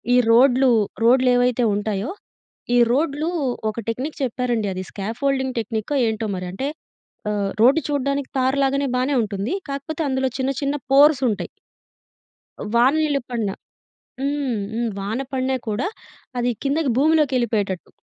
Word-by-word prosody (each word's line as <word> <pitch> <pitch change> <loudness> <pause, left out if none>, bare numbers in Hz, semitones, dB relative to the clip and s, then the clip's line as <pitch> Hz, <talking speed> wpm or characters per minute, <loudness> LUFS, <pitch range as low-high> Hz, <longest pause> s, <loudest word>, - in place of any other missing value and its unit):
ఈ - - +6
రోడ్లు, 255 +1 +5 0.3
రోడ్లేవైతే 250 -1 +4
ఉంటాయో 205 - -2 0.6
ఈ - - +5
రోడ్లు 295 +4 0 0.4
ఒక 215 - -7
టెక్నిక్ 260 +7 -3
చెప్పారండి 240 -3 -1
అది 185 0 -4
స్కాఫోల్డింగ్ 260 +5 -2
టెక్నికో 225 +5 -3
ఏంటో 220 0 -2
మరి 180 0 -5
అంటే 265 +9 -3 0.6
ఆహ్, 200 -1 -1
రోడ్డు 275 +7 +5
చూడడానికి 280 -1 -1
తార్ 260 +2 +1
లాగానే 275 +1 +1
బానే 260 +3 +1
ఉంటుంది. 205 - -3 0.2
కాకపోతే 280 +3 -4
అందులో 265 0 0
చిన్న 265 +1 +1
చిన్న 280 +1 0 0.2
పోర్సుంటాయి. 275 -6 +4 1.2
వాన 245 +4 +5
నీళ్ళు 290 -3 +1
పడిన 225 -5 -1 0.7
హ్మ్. 280 -4 -1 0.2
హ్మ్. 235 +1 -1
వాన 215 +6 -3
పడిన 260 0 0 0.2
కూడా 215 - -1 0.5
అది 245 0 +1
కిందకి 280 -2 +1
భూమిలోకెళ్ళిపోయేటట్టు. 250 - +1
255 Hz, 125 wpm, -22 LUFS, 225-275 Hz, 1.2 s, ఈ